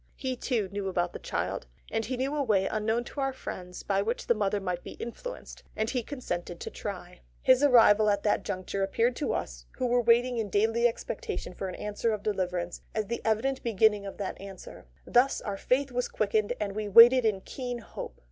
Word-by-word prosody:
He, 260 Hz, -2 st, -3 dB
too, 240 Hz, -5 st, -1 dB
knew 200 Hz, 0 st, -4 dB
about 175 Hz, -2 st, -1 dB
the -, -, -6 dB
child; -, -, -3 dB, 0.2 s
and 225 Hz, -, 0 dB
he 250 Hz, +4 st, -3 dB
knew 270 Hz, +3 st, -1 dB
a 295 Hz, -, +1 dB
way 210 Hz, -7 st, +2 dB
unknown 220 Hz, +3 st, 0 dB
to 280 Hz, -, -8 dB
our 270 Hz, 0 st, +1 dB
friends 180 Hz, -8 st, -7 dB
by 195 Hz, -1 st, +1 dB
which 230 Hz, +4 st, -2 dB
the -, -, +4 dB
mother 205 Hz, -2 st, 0 dB
might 180 Hz, -2 st, -3 dB
be -, -, -8 dB
influenced, -, -, -8 dB
and 220 Hz, +1 st, -1 dB
he 250 Hz, -2 st, 0 dB
consented 175 Hz, -, -5 dB
to -, -, -6 dB
try. 180 Hz, -3 st, -7 dB, 0.2 s
His 260 Hz, 0 st, +5 dB
arrival 225 Hz, -6 st, +6 dB
just 205 Hz, -1 st, +4 dB
at 200 Hz, -, -16 dB
that 210 Hz, -, +1 dB
juncture 185 Hz, +1 st, -3 dB
appeared 230 Hz, +5 st, +1 dB
to 290 Hz, -, -1 dB
us, -, -, -5 dB
who 255 Hz, -, -1 dB
were 245 Hz, 0 st, +3 dB
waiting 240 Hz, +1 st, +3 dB
in 215 Hz, -2 st, -2 dB
daily 225 Hz, +4 st, +3 dB
expectation -, -, -4 dB
of -, -, -20 dB
an 190 Hz, -2 st, -3 dB
answer 210 Hz, +2 st, -1 dB
of 210 Hz, -1 st, -4 dB
deliverance, 180 Hz, -4 st, -2 dB
as 215 Hz, -1 st, 0 dB
the 235 Hz, +4 st, -4 dB
evident 245 Hz, +5 st, 0 dB
beginning 210 Hz, -2 st, +2 dB
of 195 Hz, -, -8 dB
that 195 Hz, -2 st, -5 dB
answer; 195 Hz, -, -10 dB, 0.2 s
thus 255 Hz, +3 st, +3 dB
our 205 Hz, -, -4 dB
faith 260 Hz, +6 st, 0 dB
was 250 Hz, 0 st, -1 dB
quickened 215 Hz, +1 st, 0 dB
and 205 Hz, -2 st, -2 dB
we 215 Hz, -1 st, -2 dB
waited 240 Hz, +4 st, +9 dB
in 210 Hz, -4 st, +1 dB
keen 245 Hz, +3 st, -5 dB
hope. 230 Hz, -, -8 dB
220 Hz, 215 wpm, -29 LUFS, 195-245 Hz, 0.2 s, waited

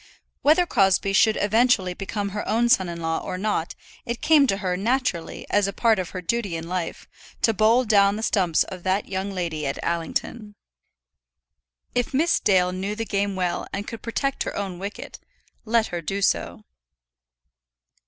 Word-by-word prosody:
Whether 315 Hz, +5 st, +4 dB
Crosbie 195 Hz, -, +2 dB
should 220 Hz, +2 st, +4 dB
eventually 210 Hz, -3 st, +2 dB
become 200 Hz, +2 st, -4 dB
her 210 Hz, +1 st, -4 dB
own 235 Hz, +3 st, +2 dB
son 190 Hz, -6 st, +3 dB
in 170 Hz, 0 st, -6 dB
law 165 Hz, 0 st, -1 dB
or 185 Hz, -, -5 dB
not 195 Hz, -4 st, -2 dB, 0.3 s
it 235 Hz, 0 st, -4 dB
came 300 Hz, -3 st, +5 dB
to 195 Hz, -, +1 dB
her 185 Hz, -3 st, -1 dB
naturally, 225 Hz, -4 st, -1 dB
as 205 Hz, -1 st, +3 dB
a 200 Hz, -, -4 dB
part 225 Hz, -2 st, +2 dB
of 180 Hz, -, -3 dB
her 185 Hz, -, -6 dB
duty 205 Hz, -2 st, -1 dB
in 165 Hz, 0 st, -5 dB
life, 180 Hz, -2 st, -4 dB, 0.4 s
to 225 Hz, -, +4 dB
bowl 220 Hz, +4 st, +4 dB
down 200 Hz, -2 st, +4 dB
the 220 Hz, -, -5 dB
stumps 185 Hz, -8 st, +2 dB
of 185 Hz, -, -9 dB
that 190 Hz, +3 st, 0 dB
young 190 Hz, +1 st, -3 dB
lady 170 Hz, -6 st, -3 dB
at 135 Hz, -, -3 dB
Allington. 205 Hz, +6 st, -3 dB, 1.4 s
If 245 Hz, +2 st, -1 dB
Miss 330 Hz, +5 st, +3 dB
Dale 180 Hz, -3 st, +3 dB
knew 190 Hz, +3 st, -3 dB
the 225 Hz, +1 st, -3 dB
game 200 Hz, -1 st, -1 dB
well 180 Hz, -2 st, -2 dB
and 200 Hz, -, -4 dB
could 230 Hz, -3 st, -7 dB
protect 275 Hz, +4 st, -2 dB
her -, -, -3 dB
own 190 Hz, -3 st, -4 dB
wicket, 200 Hz, +2 st, -7 dB, 0.5 s
let 225 Hz, 0 st, +2 dB
her 175 Hz, -, -2 dB
do 195 Hz, +5 st, -3 dB
so. 215 Hz, -, 0 dB
200 Hz, 175 wpm, -24 LUFS, 185-225 Hz, 1.4 s, came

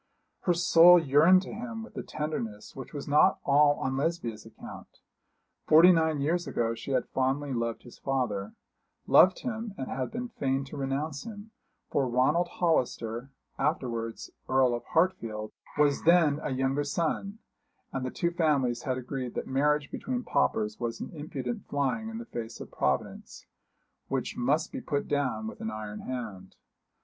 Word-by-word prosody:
Her 180 Hz, -, +4 dB
soul 175 Hz, +1 st, +7 dB
yearned 165 Hz, +4 st, +5 dB
to -, -, -8 dB
him 225 Hz, 0 st, -6 dB
with 230 Hz, -, -13 dB
a -, -, -3 dB
tenderness 115 Hz, -9 st, -5 dB
which 130 Hz, -2 st, -8 dB
was 145 Hz, -, -6 dB
not 150 Hz, +6 st, +5 dB
all 145 Hz, +1 st, +5 dB
on 130 Hz, -1 st, -2 dB
Lesbia's 140 Hz, -7 st, -2 dB
account. -, -, -12 dB, 0.7 s
Forty 165 Hz, +4 st, +8 dB
nine 160 Hz, -3 st, +2 dB
years 170 Hz, +5 st, 0 dB
ago 115 Hz, -1 st, 0 dB
she 115 Hz, -, -8 dB
had 130 Hz, -3 st, 0 dB
fondly 135 Hz, +2 st, 0 dB
loved 115 Hz, -1 st, -2 dB
his 120 Hz, -, -14 dB
father 115 Hz, -8 st, -2 dB, 0.5 s
loved 185 Hz, 0 st, +6 dB
him 225 Hz, -4 st, -4 dB
and 130 Hz, -, -5 dB
had 130 Hz, -1 st, -2 dB
been 245 Hz, +2 st, -5 dB
fain 135 Hz, -, -1 dB
to 135 Hz, -, -10 dB
renounce 140 Hz, +2 st, -2 dB
him; 215 Hz, -1 st, -9 dB, 0.4 s
for 135 Hz, -3 st, +1 dB
Ronald 130 Hz, +8 st, +2 dB
Hollister, 130 Hz, -8 st, -1 dB, 0.3 s
afterwards 115 Hz, -7 st, -2 dB, 0.2 s
Earl 130 Hz, -2 st, +4 dB
of 120 Hz, -, -4 dB
Hartfield, 115 Hz, -12 st, 0 dB, 0.3 s
was 145 Hz, -1 st, +3 dB
then 160 Hz, -4 st, +4 dB
a -, -, -3 dB
younger 135 Hz, +2 st, 0 dB
son, 170 Hz, +7 st, -2 dB, 0.6 s
and 135 Hz, -, -2 dB
the 130 Hz, -, -2 dB
two 170 Hz, +6 st, -1 dB
families 140 Hz, -8 st, +1 dB
had 130 Hz, 0 st, -2 dB
agreed 130 Hz, -1 st, -5 dB
that -, -, -3 dB
marriage 145 Hz, +2 st, +1 dB
between 250 Hz, -1 st, -3 dB
paupers 105 Hz, -, 0 dB
was 115 Hz, -1 st, -3 dB
an -, -, -6 dB
impudent 140 Hz, -6 st, -5 dB
flying 145 Hz, +11 st, -1 dB
in 225 Hz, -, -6 dB
the 235 Hz, -, -7 dB
face 115 Hz, -, -6 dB
of -, -, -9 dB
Providence, 70 Hz, -1 st, -2 dB, 0.6 s
which -, -, -2 dB
must 145 Hz, +6 st, 0 dB
be -, -, -5 dB
put 145 Hz, -1 st, -2 dB
down 125 Hz, -7 st, -1 dB
with 110 Hz, -, -7 dB
an 110 Hz, -, -2 dB
iron 110 Hz, -1 st, -6 dB
hand. 105 Hz, -8 st, -6 dB
140 Hz, 165 wpm, -29 LUFS, 120-165 Hz, 0.7 s, Forty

